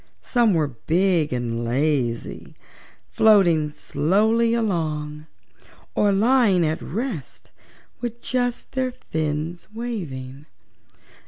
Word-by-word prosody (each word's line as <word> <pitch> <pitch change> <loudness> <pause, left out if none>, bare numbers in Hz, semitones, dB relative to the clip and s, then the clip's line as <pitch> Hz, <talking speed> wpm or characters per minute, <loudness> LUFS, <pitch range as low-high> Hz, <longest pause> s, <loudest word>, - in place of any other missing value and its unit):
Some 235 -6 +3
were 155 -3 +1
big 165 +5 +1
and 120 -2 -2
lazy, 125 -1 -1 0.6
floating 175 -8 +4
slowly 215 +12 +1
along 155 -8 -2 0.7
or 205 -1 +3
lying 205 -4 +4
at 155 +2 -1
rest 220 - -5 0.5
with 240 -1 -5
just 245 -1 -2
their 260 -1 -1
fins 160 -6 -3
waving. 150 - -6
175 Hz, 90 wpm, -23 LUFS, 150-225 Hz, 0.7 s, floating